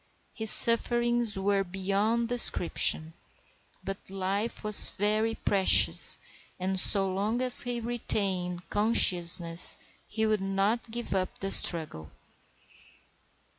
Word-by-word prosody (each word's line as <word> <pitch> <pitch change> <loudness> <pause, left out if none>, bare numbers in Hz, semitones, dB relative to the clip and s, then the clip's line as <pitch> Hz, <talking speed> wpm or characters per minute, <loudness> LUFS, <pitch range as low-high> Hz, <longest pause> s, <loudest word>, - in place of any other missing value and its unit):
His 220 -1 -2
sufferings 240 -1 +2
were 195 0 -2
beyond 200 +5 -3
description; 175 -8 +2 0.7
but 195 -1 -9
life 195 +4 -5
was 210 -1 +4
very 215 +2 -2
precious, 195 -2 +3 0.4
and 190 +1 -3
so 195 0 +3
long 210 +5 -4
as 250 -1 +7
he 245 -1 -2
retained 195 -7 -2
consciousness 175 -5 0 0.3
he 220 -1 -4
would 215 -2 -2
not 195 +5 -4
give 235 -1 -6
up 185 -1 -5
the 195 0 -4
struggle. 150 - 0
200 Hz, 105 wpm, -25 LUFS, 190-225 Hz, 0.7 s, as